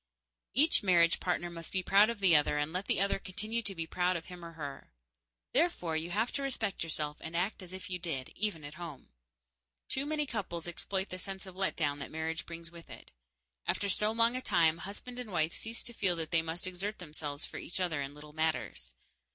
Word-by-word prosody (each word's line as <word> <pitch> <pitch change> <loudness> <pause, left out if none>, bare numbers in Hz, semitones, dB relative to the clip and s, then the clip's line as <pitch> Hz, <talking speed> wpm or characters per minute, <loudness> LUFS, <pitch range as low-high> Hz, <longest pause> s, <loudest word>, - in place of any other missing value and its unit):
Each 305 +5 +6
marriage 170 -3 +5
partner 175 -1 0
must 165 -1 -6
be 190 -1 +1
proud 200 +4 +6
of 230 -3 -3
the 180 -4 +7
other 150 0 +4
and 150 +2 0
let 185 +2 -2
the - - +3
other 195 0 +3
continue 215 +5 -2
to 200 -3 -2
be 165 -1 -2
proud 180 +2 +1
of 165 - -3
him 180 -1 -9
or 165 0 -7
her. 145 - -7 0.6
Therefore 265 - +2
you 160 +2 -1
have 220 +6 +1
to 280 - -2
respect 225 -9 -1
yourself 150 -2 -2
and 165 +1 -3
act 190 +4 0
as 185 -1 -9
if 190 +2 -7
you 180 -2 -2
did, 150 -7 -3
even 205 -7 -1
at 145 +1 -7
home. 160 -6 -7 0.8
Too 270 +2 +1
many 300 -1 +1
couples 185 - -3
exploit 190 +3 -1
the 185 - -5
sense 195 0 -5
of 190 -1 -10
let 190 0 +1
down 145 -3 +1
that 140 - -5
marriage 160 +1 -2
brings 170 0 -6
with 170 -1 -12
it. - - -11 0.6
After 200 - +1
so 210 +2 +3
long 230 +2 +4
a 255 - -1
time, 165 -7 +4
husband 245 +5 -7
and 240 -4 -5
wife 160 -2 +2
cease 225 +1 -3
to 240 - -4
feel 185 -5 +2
that 160 -2 -3
they 165 - +5
must 165 +3 -3
exert 190 +4 -2
themselves 150 -3 -5
for - - -8
each 180 - -4
other 170 -5 +1
in 140 +1 -4
little 150 0 -11
matters. 155 - -1
175 Hz, 225 wpm, -33 LUFS, 160-200 Hz, 0.8 s, the